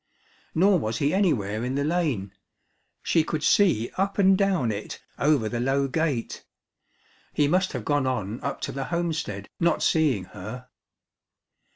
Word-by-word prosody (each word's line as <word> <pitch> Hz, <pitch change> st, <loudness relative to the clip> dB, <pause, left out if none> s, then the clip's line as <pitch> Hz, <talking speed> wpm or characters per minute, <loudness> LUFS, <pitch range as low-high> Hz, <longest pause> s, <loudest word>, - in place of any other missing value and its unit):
Nor 190 Hz, +2 st, +4 dB
was 115 Hz, -4 st, -2 dB
he 145 Hz, +5 st, +1 dB
anywhere 115 Hz, -, +1 dB
in 125 Hz, +2 st, -2 dB
the 140 Hz, -, 0 dB
lane 145 Hz, -, -1 dB, 0.7 s
she 165 Hz, -, +2 dB
could 155 Hz, -1 st, -3 dB
see 170 Hz, -, +3 dB
up 195 Hz, +1 st, 0 dB
and 195 Hz, -1 st, +5 dB
down 185 Hz, -, +1 dB
it 105 Hz, 0 st, -6 dB, 0.2 s
over 140 Hz, -6 st, +2 dB
the 120 Hz, +2 st, -3 dB
low 135 Hz, +3 st, +1 dB
gate. 140 Hz, -4 st, -2 dB, 0.9 s
He 145 Hz, -, +2 dB
must 185 Hz, +5 st, +1 dB
have 125 Hz, -5 st, -5 dB
gone 145 Hz, -2 st, +1 dB
on 115 Hz, -3 st, -2 dB
up -, -, -4 dB
to -, -, -3 dB
the 135 Hz, -1 st, -4 dB
homestead, 160 Hz, -, -3 dB
not 170 Hz, 0 st, +2 dB
seeing 145 Hz, -, +2 dB
her. 110 Hz, +6 st, -8 dB
140 Hz, 155 wpm, -25 LUFS, 115-170 Hz, 0.9 s, and